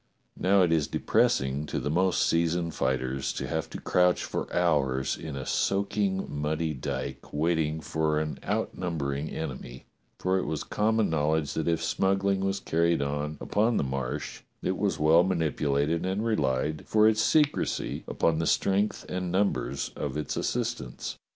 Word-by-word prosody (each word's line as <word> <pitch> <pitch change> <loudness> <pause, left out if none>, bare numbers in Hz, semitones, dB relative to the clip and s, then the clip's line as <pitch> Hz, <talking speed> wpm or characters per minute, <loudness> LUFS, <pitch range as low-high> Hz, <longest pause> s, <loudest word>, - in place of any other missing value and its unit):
Now 95 0 +4
it 85 - +2
is 80 -3 +2
depressing 70 +3 +1
to - - -3
the 75 - -2
most 90 +3 +2
seasoned 85 0 +1
fighters 65 0 -1
to - - -4
have 80 -1 -2
to - - -7
crouch 90 0 +2
for - - -4
hours 70 -6 +1
in 75 -3 -7
a 65 -1 -5
soaking 100 -1 0
muddy 75 +2 -2
dyke 65 - -5
wait 80 +4 +1
ting 80 0 -1
for 80 -1 0
an 75 0 -3
outnumbering 75 -5 -2
enemy; 65 -4 -6 0.3
for 95 +1 +1
it - - -3
was 80 - -2
common 110 -2 +1
knowledge 80 -1 +1
that 80 - -2
if 85 -1 +1
smuggling 95 +3 +1
was 95 +1 -1
carried 85 -4 +1
on 75 +2 -3
upon 110 +3 +1
the - - +1
Marsh, 65 -2 -4 0.2
it - - 0
was - - 0
well 80 +3 +5
manipulated 80 -3 0
and 95 +4 -1
relied 75 - 0
for 110 0 +5
its 110 0 +3
secrecy 150 +3 +1
upon 80 -1 +1
the 80 - 0
strength 100 +2 +1
and 90 -1 -3
numbers 90 -9 0
of 70 0 -3
its 75 - -3
assistants. - - -3
80 Hz, 160 wpm, -28 LUFS, 75-95 Hz, 0.3 s, well